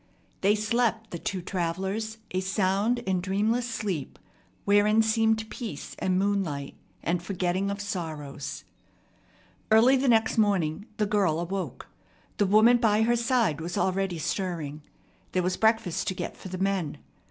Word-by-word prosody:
They 200 Hz, +2 st, +4 dB
slept, 225 Hz, +1 st, 0 dB
the 170 Hz, -, -5 dB
two 185 Hz, 0 st, -3 dB
travellers, 190 Hz, +6 st, -2 dB
a 185 Hz, -, 0 dB
sound 200 Hz, +5 st, +1 dB
and 185 Hz, -2 st, 0 dB
dreamless 215 Hz, +6 st, 0 dB
sleep, 200 Hz, -, -3 dB, 0.5 s
wherein 210 Hz, +2 st, +4 dB
seemed 220 Hz, 0 st, +2 dB
peace 215 Hz, -, -6 dB
and 185 Hz, -1 st, +1 dB
moonlight, 185 Hz, -8 st, -1 dB, 0.3 s
and 175 Hz, +2 st, 0 dB
a -, -, -15 dB
forgetting 185 Hz, +1 st, -1 dB
of 200 Hz, +1 st, -3 dB
sorrows. 155 Hz, -8 st, -5 dB, 1.1 s
Early 225 Hz, +5 st, +6 dB
the 270 Hz, +1 st, 0 dB
next 225 Hz, -1 st, +3 dB
morning 200 Hz, -2 st, +1 dB
the 210 Hz, -, +2 dB
girl 195 Hz, -6 st, +1 dB
awoke. 175 Hz, -7 st, -4 dB, 0.5 s
The 205 Hz, -, +2 dB
woman 220 Hz, +5 st, +6 dB
by 220 Hz, -2 st, +3 dB
her 240 Hz, +2 st, +3 dB
side 230 Hz, -, +1 dB
was 170 Hz, +1 st, -4 dB
already 190 Hz, -1 st, 0 dB
stirring. 160 Hz, -3 st, -3 dB, 0.5 s
There 185 Hz, -, +1 dB
was 180 Hz, +1 st, 0 dB
breakfast 220 Hz, -6 st, +1 dB
to 190 Hz, -, -1 dB
get -, -, -5 dB
for 190 Hz, -, -10 dB
the 185 Hz, -, -5 dB
men. 190 Hz, -5 st, -1 dB
195 Hz, 150 wpm, -27 LUFS, 175-220 Hz, 1.1 s, Early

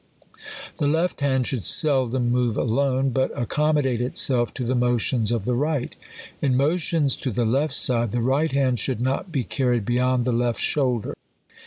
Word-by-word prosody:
The 145 Hz, -, +1 dB
left 165 Hz, +2 st, 0 dB
hand 130 Hz, -3 st, +1 dB
should 125 Hz, -6 st, -3 dB
seldom 130 Hz, -, +2 dB
move 120 Hz, -3 st, 0 dB
alone, 135 Hz, +2 st, 0 dB
but 130 Hz, +2 st, 0 dB
ac 120 Hz, -, -1 dB
commodate 145 Hz, -5 st, +1 dB
itself 125 Hz, -1 st, +1 dB
to 125 Hz, -, -4 dB
the 125 Hz, +2 st, -1 dB
motions 120 Hz, -2 st, +1 dB
of 115 Hz, -4 st, -2 dB
the 125 Hz, -, 0 dB
right. 145 Hz, +1 st, -1 dB, 0.5 s
In 130 Hz, -3 st, +1 dB
mo 145 Hz, +6 st, +2 dB
tions 155 Hz, -5 st, +1 dB
to 130 Hz, -, -3 dB
the 120 Hz, +1 st, -1 dB
left 135 Hz, +7 st, +1 dB
side, 120 Hz, -3 st, +1 dB
the 120 Hz, -, -1 dB
right 135 Hz, +7 st, +1 dB
hand 130 Hz, -3 st, +1 dB
should 125 Hz, +2 st, -2 dB
not 135 Hz, +9 st, -2 dB
be 135 Hz, -5 st, -1 dB
car 130 Hz, +1 st, -2 dB
ried 120 Hz, -4 st, 0 dB
beyond 125 Hz, +1 st, +1 dB
the 125 Hz, -, +1 dB
left 120 Hz, 0 st, 0 dB
shoulder. 125 Hz, -6 st, -1 dB
130 Hz, 185 wpm, -23 LUFS, 120-140 Hz, 0.5 s, seldom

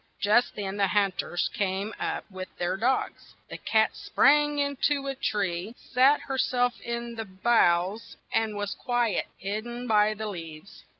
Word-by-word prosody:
Just 215 Hz, +4 st, +3 dB
then 200 Hz, -1 st, -4 dB
the 200 Hz, -1 st, +3 dB
hunt 195 Hz, -2 st, +1 dB
ers 175 Hz, -, -1 dB
came 200 Hz, +2 st, -2 dB
up -, -, -3 dB
with 185 Hz, 0 st, -6 dB
their 175 Hz, +1 st, -1 dB
dogs. 245 Hz, +7 st, -1 dB, 0.2 s
The -, -, -6 dB
cat 220 Hz, -1 st, +2 dB
sprang 295 Hz, +1 st, +3 dB
in 285 Hz, -1 st, 0 dB
to 285 Hz, -2 st, -1 dB
a 275 Hz, -, -2 dB
tree, 200 Hz, -4 st, -2 dB
sat 265 Hz, +4 st, +3 dB
her 265 Hz, -1 st, -4 dB
self 245 Hz, -1 st, +1 dB
in 235 Hz, 0 st, -4 dB
the 225 Hz, -1 st, -5 dB
boughs, 190 Hz, -1 st, +1 dB, 0.2 s
and 220 Hz, -2 st, +1 dB
was 205 Hz, -1 st, -2 dB
quite 240 Hz, -3 st, 0 dB
hid 205 Hz, +3 st, -3 dB
den 240 Hz, +1 st, -6 dB
by 215 Hz, -2 st, +3 dB
the 215 Hz, +1 st, -5 dB
leaves. 165 Hz, -3 st, -8 dB
215 Hz, 170 wpm, -27 LUFS, 195-245 Hz, 0.2 s, Just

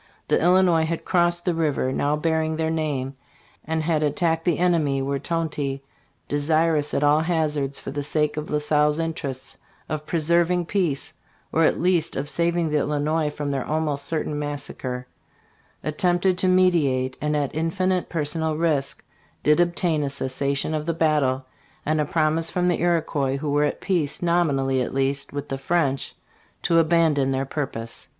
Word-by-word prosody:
The -, -, +3 dB
Illinois 175 Hz, -2 st, +4 dB
had 165 Hz, 0 st, -3 dB
crossed 175 Hz, -1 st, +1 dB
the 180 Hz, -, +2 dB
river 150 Hz, -5 st, 0 dB
now 145 Hz, +2 st, +1 dB
bearing 160 Hz, 0 st, 0 dB
their 160 Hz, 0 st, 0 dB
name 145 Hz, -5 st, -2 dB, 0.5 s
and 160 Hz, 0 st, -2 dB
had 155 Hz, -1 st, +1 dB
attacked 160 Hz, +2 st, 0 dB
the 175 Hz, -4 st, +2 dB
enemy, 165 Hz, -6 st, +2 dB
when 140 Hz, +1 st, -1 dB
Tonty, 150 Hz, -5 st, -2 dB, 0.4 s
desirous 150 Hz, 0 st, +1 dB
at 140 Hz, -, +1 dB
all 145 Hz, +1 st, +5 dB
hazards, 150 Hz, -4 st, 0 dB
for -, -, -7 dB
the 145 Hz, +1 st, -3 dB
sake 150 Hz, +1 st, 0 dB
of 150 Hz, 0 st, -5 dB
La 150 Hz, -, +1 dB
Salle's 150 Hz, 0 st, +2 dB
interests, 150 Hz, -5 st, -4 dB, 0.3 s
of 150 Hz, 0 st, -4 dB
preserving 170 Hz, +2 st, +2 dB
peace, 170 Hz, -7 st, -1 dB, 0.4 s
or 165 Hz, 0 st, +3 dB
at -, -, +2 dB
least 175 Hz, -2 st, +1 dB
of 140 Hz, +2 st, -2 dB
saving 170 Hz, -1 st, +1 dB
the 150 Hz, -, +2 dB
Illinois 150 Hz, +2 st, 0 dB
from 145 Hz, -1 st, -4 dB
their 135 Hz, -2 st, -1 dB
almost 150 Hz, -2 st, -1 dB
certain 155 Hz, -1 st, -2 dB
massacre, 135 Hz, -3 st, -4 dB, 0.8 s
attempted 175 Hz, +4 st, +1 dB
to 185 Hz, -, +2 dB
mediate, 155 Hz, -9 st, +2 dB
and, 150 Hz, 0 st, 0 dB
at 145 Hz, -2 st, -1 dB
infinite 180 Hz, +3 st, 0 dB
personal 160 Hz, 0 st, -1 dB
risk, 155 Hz, -5 st, 0 dB, 0.4 s
did 150 Hz, +2 st, +4 dB
obtain 175 Hz, -2 st, +1 dB
a 140 Hz, -, -1 dB
cessation 140 Hz, +2 st, 0 dB
of 155 Hz, 0 st, -3 dB
the 165 Hz, -, 0 dB
battle 145 Hz, -5 st, +1 dB, 0.4 s
and 155 Hz, 0 st, +1 dB
a -, -, 0 dB
promise 160 Hz, +1 st, +1 dB
from 180 Hz, 0 st, +1 dB
the 175 Hz, -, 0 dB
Iroquois, 155 Hz, -6 st, 0 dB
who 145 Hz, +1 st, -3 dB
were 145 Hz, +1 st, +3 dB
at -, -, -3 dB
peace, 165 Hz, -7 st, -1 dB
nominally 140 Hz, -7 st, +2 dB
at 125 Hz, -, -3 dB
least, 135 Hz, +1 st, 0 dB
with 145 Hz, 0 st, -5 dB
the 135 Hz, -, -3 dB
French, 140 Hz, -3 st, 0 dB, 0.5 s
to 165 Hz, -1 st, +4 dB
abandon 160 Hz, -4 st, +3 dB
their 135 Hz, 0 st, 0 dB
purpose. 120 Hz, -5 st, -4 dB
155 Hz, 165 wpm, -24 LUFS, 140-165 Hz, 0.8 s, all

